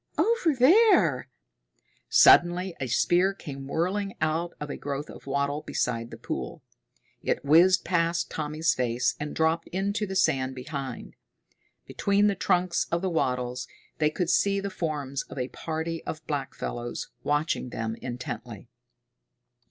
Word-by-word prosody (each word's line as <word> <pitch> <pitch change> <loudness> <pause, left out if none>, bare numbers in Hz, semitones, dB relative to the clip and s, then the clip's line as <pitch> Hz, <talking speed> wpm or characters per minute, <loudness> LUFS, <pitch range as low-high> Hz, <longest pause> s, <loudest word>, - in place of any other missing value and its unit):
Over 440 - +2
there!" 400 - +5 0.8
Suddenly 175 +1 +5
a 130 - -2
spear 180 - +2
came 135 -6 -8
whirling 190 +7 -1
out 160 +2 -1
of 150 -1 -5
a - - -4
growth 145 +1 -5
of - - -13
wattle 140 +2 -1
beside 115 -4 -2
the - - -9
pool. - - -5 0.6
It - - -1
whizzed 175 +5 +5
past 170 -1 0
Tommy's 155 +2 0
face 125 -1 0
and 150 0 -5
dropped 160 +1 +1
into 200 +3 -2
the 190 - -5
sand 130 -7 +1
behind. 135 -1 -6 0.7
Between 200 +1 +1
the 205 - +3
trunks 180 -2 +1
of 170 +2 0
the 190 - 0
wattles 125 -5 -1 0.3
they 150 -1 +3
could 175 +2 -1
see 200 +2 +2
the 200 0 -4
forms 145 -6 -3
of - - -9
a 125 0 -2
party 160 +1 -4
of 155 0 -6
blackfellows, 130 -4 -4
watching 145 -3 0
them 115 -1 -3
intently. 125 0 -6
160 Hz, 140 wpm, -27 LUFS, 135-185 Hz, 0.8 s, there